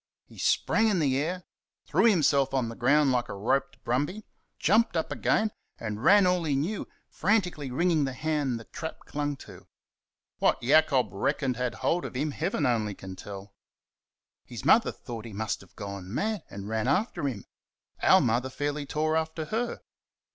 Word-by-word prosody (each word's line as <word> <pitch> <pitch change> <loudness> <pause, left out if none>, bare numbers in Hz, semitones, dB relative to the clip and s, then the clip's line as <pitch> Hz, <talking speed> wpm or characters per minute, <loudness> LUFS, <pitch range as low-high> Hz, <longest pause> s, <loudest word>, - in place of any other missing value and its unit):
He - - -15
sprang 225 0 +2
in 210 -4 +2
the 140 -5 +2
air 175 +5 -2 0.4
threw - - +2
himself 145 - +3
on 125 -3 0
the 115 - -7
ground 140 +3 +3
like 125 -1 0
a - - -5
roped 115 +7 0
brumby 145 - -1 0.3
jumped 220 -4 +3
up 160 - -2
again 215 0 +1 0.3
and 110 0 -5
ran 205 -1 +7
all 180 -1 +2
he 150 -3 0
knew, 170 +10 -2 0.2
frantically 180 -7 0
wringing 160 +3 +2
the 135 - -3
hand 145 -4 -1
the - - -10
trap 160 +7 -7
clung 145 0 -3
to. - - -13 0.7
What - - +2
Jacob 135 -4 +4
reckoned 125 +6 0
had 125 -1 -2
hold 175 +1 +2
of - - -6
him 145 +4 -1
Heaven 145 +1 -1
only 110 -5 0
can 95 0 -9
tell. 100 0 -9 0.9
His - - -9
mother - - +5
thought 115 -2 -8
he 115 - -8
must 110 +1 -2
have 95 - -19
gone 100 -2 -7
mad 210 - -2
and 100 0 -7
ran 110 0 -1
after 215 -9 0
him. 115 -8 -5 0.6
Our - - +6
Mother 120 +3 +1
fairly 145 +1 -3
tore 155 +2 0
after 160 0 -1
her. 235 +7 -2
140 Hz, 175 wpm, -28 LUFS, 115-160 Hz, 0.9 s, ran